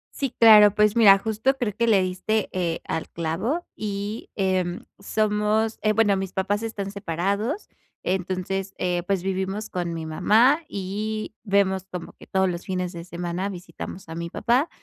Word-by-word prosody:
Sí, 275 - -1
claro. 210 -3 +8
Pues 210 0 +3
mira, 205 -4 +8
justo 220 +6 0
creo 225 -5 -1
que 235 0 +1
le 210 -3 +5
diste, 185 +4 -1
eh, 175 -3 -1
al 160 - -3
clavo, 185 - -2
y 205 +1 -4
,em, 185 -3 0 0.2
somos 215 +1 0
eh, 215 0 +2
bueno, 205 -2 +3
mis 190 -1 -4
papás 205 +2 0
están 210 -3 -4
separados. 200 - -2 0.4
Entonces, 190 +1 -2
eh, 180 -1 0
pues, 195 -3 0
vivimos 195 +2 -2
con 175 -2 -2
mi 160 -1 -5
mamá, 225 - +4
y 210 +3 -4
vemos 195 -2 +1
como 180 -2 -6
que - - -16
todos 190 0 +2
los 175 -1 -3
fines 180 -1 -2
de 170 0 -7
semana 175 +2 -3
visitamos 185 0 -8
a 165 - -7
mi 170 +1 -4
papá. 250 - +1
195 Hz, 165 wpm, -24 LUFS, 180-215 Hz, 0.4 s, claro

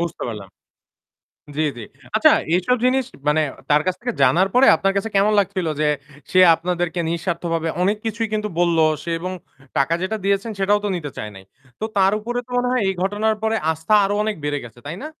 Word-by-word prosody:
বুঝতে 170 -1 -4
পারলাম। 105 -4 -7 1.1
জ্বী, 155 +1 +1
জ্বী। 115 - -7 0.3
আচ্ছা, 310 +7 +6 0.2
এইসব 185 +8 +2
জিনিস 260 0 +2 0.2
মানে 150 +1 +3 0.3
তার 150 +1 +4
কাছ 185 - +1
থেকে 245 0 -2
জানার 170 +9 +4
পরে 255 +2 +5
আপনার 195 +4 0
কাছে 210 +3 -1
কেমন 205 +2 +4
লাগছিল 190 -3 -1
যে 150 - +2 0.4
সে 185 - +4 0.2
আপনাদেরকে 175 0 -2
নিঃস্বার্থভাবে 170 -1 -2
অনেক 200 +3 +2
কিছুই 225 +1 -1
কিন্তু 210 0 -1
বললো 170 -2 +3 0.2
সে 170 - -4
এবং 185 +2 -4 0.5
টাকা 140 +4 +2
যেটা 210 +4 -2
দিয়েছেন 200 +3 0
সেটাও 205 +2 +3
তো - - +1
নিতে 150 -5 -5
চায় 105 0 -5
নাই। 95 - -12 0.4
তো - - -5
তার 195 0 +4
উপরে 240 +3 -3
তো - - -30
মনে 245 0 +1
হয় 255 -3 +1
এই 190 - +1
ঘটনার 210 +3 0
পরে 220 0 +1 0.2
আস্থা 160 +6 -2
আরও 205 +1 -1
অনেক 215 0 -1
বেড়ে 145 -1 -1
গেছে 120 0 -14
তাই 165 - -5
না? - - -4
185 Hz, 200 wpm, -21 LUFS, 165-215 Hz, 1.1 s, আচ্ছা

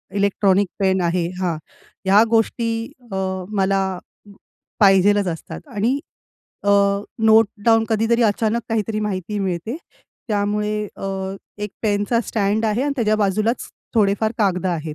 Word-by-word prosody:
Electronic 200 -1 +2
pen 190 -1 +2
आहे 170 0 0
हां. 175 -3 0 0.5
ह्या 200 +3 +6
गोष्टी 225 0 0 0.2
अ, - - -3 0.3
मला 195 -2 +1 1.0
पाहिजेलच 200 0 +5
असतात 165 - -6
आणि 235 +7 +1 0.7
अ, 200 - +3 0.5
नोट 220 0 +6 0.2
डाउन 225 -1 +4
कधीतरी 225 +2 +2
अचानक 225 +1 +1
काहीतरी 220 -1 -1
माहिती 205 -1 -3
मिळते. 190 - -2 0.5
त्यामुळे 210 0 0 0.2
अ, - - -7 0.5
एक 210 0 -4
पेनचा 210 +2 +1
स्टॅड 210 +1 0
आहे 220 +3 +1
आणि 285 0 0
त्याच्या 215 -4 +2
बाजूलाच 215 +3 0 0.3
थोडेफार 215 0 +2
कागदं 190 -3 +1
आहेत. 160 -3 -3
210 Hz, 125 wpm, -21 LUFS, 195-225 Hz, 1.0 s, ह्या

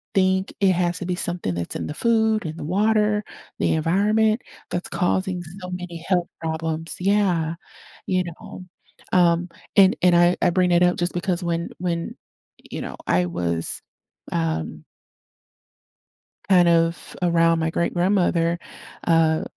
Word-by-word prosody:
think 190 0 +2
it 190 -1 +5
has 175 0 0
to - - -5
be 180 - -1
something 175 - -2
that's 85 -1 -4
in - - -4
the - - -4
food, 220 -1 +2
in 160 0 -5
the - - -6
water, 210 +3 +2 0.4
the - - +2
environment 210 +8 +2 0.3
that's 175 - -3
causing 185 0 0 0.2
so 180 - -6
many 180 -1 -6
health 180 -2 +1
problems. 160 0 -3
Yeah. 180 -5 +1 0.5
You 185 -1 +1
know? 170 +2 -9 0.5
Um, 175 0 +3 0.3
and 195 -1 +6
and 180 -1 +5
I 175 +1 +4
I - - +4
bring 180 0 +2
it 175 - +4
up 180 - +2
just 175 0 -1
because 175 0 -1
when 170 0 -2
when, 170 -2 -3 0.6
you - - -5
know, - - -6
I 90 0 +2
was, 85 -1 -2 0.5
um 80 - -2 1.7
kind 180 -2 +6
of 165 0 +1
around 165 -1 +3
my 160 - 0
great-grandmother, 175 0 +1 0.5
uh, 160 -1 +3
175 Hz, 145 wpm, -23 LUFS, 165-185 Hz, 1.7 s, and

